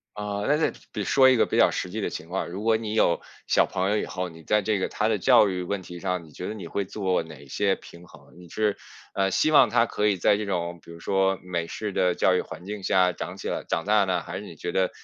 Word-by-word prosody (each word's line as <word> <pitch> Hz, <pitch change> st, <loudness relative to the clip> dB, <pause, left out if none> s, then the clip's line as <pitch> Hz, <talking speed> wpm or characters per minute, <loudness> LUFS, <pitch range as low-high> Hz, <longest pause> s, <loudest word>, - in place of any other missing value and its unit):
啊， 105 Hz, -1 st, -3 dB
那 145 Hz, -, +3 dB
再 155 Hz, -, +1 dB, 0.2 s
得 -, -, -3 dB
说 130 Hz, -1 st, +5 dB
一 130 Hz, -, +5 dB
个 115 Hz, -, +4 dB
比 -, -, -3 dB
较 -, -, +5 dB
实 90 Hz, -, -3 dB
际 110 Hz, +4 st, -4 dB
的 -, -, -1 dB
情 80 Hz, -, -7 dB
况， 95 Hz, +2 st, -3 dB
如 95 Hz, +4 st, -6 dB
果 110 Hz, 0 st, +3 dB
你 110 Hz, -1 st, -4 dB
有 85 Hz, -6 st, +3 dB, 0.3 s
小 -, -, +4 dB
朋 95 Hz, +1 st, -1 dB
友 105 Hz, -, +2 dB
以 -, -, -1 dB
后， 90 Hz, 0 st, -4 dB
你 80 Hz, -1 st, -14 dB
在 105 Hz, +4 st, +2 dB
这 105 Hz, 0 st, 0 dB
个 95 Hz, -, -1 dB
他 105 Hz, -, 0 dB
的 110 Hz, -2 st, +1 dB
教 115 Hz, +1 st, +5 dB
育 90 Hz, -1 st, -2 dB
问 95 Hz, +2 st, -3 dB
题 90 Hz, -1 st, -9 dB
上， 90 Hz, -1 st, -2 dB
你 80 Hz, -, -16 dB
觉 90 Hz, -, -7 dB
得 105 Hz, -, -4 dB
你 95 Hz, -6 st, -8 dB
会 100 Hz, -, -2 dB
做 95 Hz, -3 st, -1 dB
哪 75 Hz, -3 st, -13 dB
些 100 Hz, +7 st, +1 dB
平 85 Hz, -1 st, -14 dB
衡？ -, -, -18 dB
你 90 Hz, -1 st, -13 dB
是， 105 Hz, +3 st, 0 dB, 0.4 s
呃， 95 Hz, -1 st, +1 dB
希 155 Hz, -, +2 dB
望 140 Hz, -6 st, +6 dB
他 115 Hz, -, +3 dB
可 105 Hz, -, -1 dB
以 105 Hz, -2 st, +3 dB
在 95 Hz, +3 st, +3 dB
这 105 Hz, 0 st, -4 dB
种 85 Hz, -2 st, -2 dB
比 85 Hz, -, -13 dB
如 85 Hz, -, -12 dB
说 95 Hz, +1 st, +1 dB
美 85 Hz, -2 st, -3 dB
式 105 Hz, +5 st, -4 dB
的 90 Hz, -1 st, +2 dB
教 90 Hz, +1 st, +3 dB
育 -, -, 0 dB
环 -, -, -10 dB
境 100 Hz, 0 st, -6 dB
下 90 Hz, -1 st, +3 dB
长 -, -, -6 dB
起 -, -, -6 dB
来 -, -, -3 dB
长 80 Hz, -, -2 dB
大 105 Hz, 0 st, +4 dB
呢？ 95 Hz, -1 st, 0 dB
还 -, -, -6 dB
是 -, -, -8 dB
你 -, -, -10 dB
觉 -, -, -5 dB
得， 95 Hz, +1 st, +1 dB
95 Hz, 305 characters per minute, -25 LUFS, 90-105 Hz, 0.4 s, 望